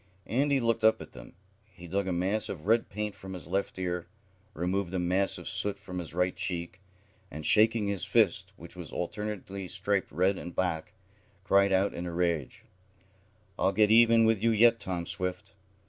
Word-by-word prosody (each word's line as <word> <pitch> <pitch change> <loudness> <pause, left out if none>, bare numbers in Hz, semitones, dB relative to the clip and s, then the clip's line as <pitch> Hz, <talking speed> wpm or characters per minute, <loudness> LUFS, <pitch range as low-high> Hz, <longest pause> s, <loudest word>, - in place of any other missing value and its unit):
Andy 140 +3 +1
looked 115 -2 0
up 110 0 +5
at - - -10
them. - - -13 0.4
He 90 - -11
dug 95 +3 -1
a - - 0
mass 95 +5 -1
of 80 -4 -6
red 115 +3 +2
paint 105 +1 -3
from 95 -1 -9
his 90 - -9
left 95 +4 -2
ear, 90 -2 -3 0.5
removed 90 +2 -1
a - - +1
mass 90 +2 +1
of - - -9
soot 100 -1 -2
from 90 -2 -7
his 85 - -6
right 90 0 +1
cheek, 90 0 -5 0.5
and, 75 0 -7
shaking 110 0 +4
his 100 -4 -2
fist, - - +2
which 85 +1 -12
was 90 -3 -9
alternately 100 0 -5
striped 100 +1 -1
red 95 +5 +1
and 85 - -8
black, 90 -4 -1 0.5
cried 100 +1 +4
out 95 +1 +2
in 90 +1 -5
a - - -4
rage: 85 -5 -1 1.0
"I'll 95 - +2
get 105 +1 +4
even 115 0 +6
with 110 -3 +2
you 115 - +3
yet, 115 +1 +5
Tom 90 -4 -3
Swift!" 90 +1 -4
95 Hz, 185 wpm, -29 LUFS, 90-105 Hz, 1.0 s, even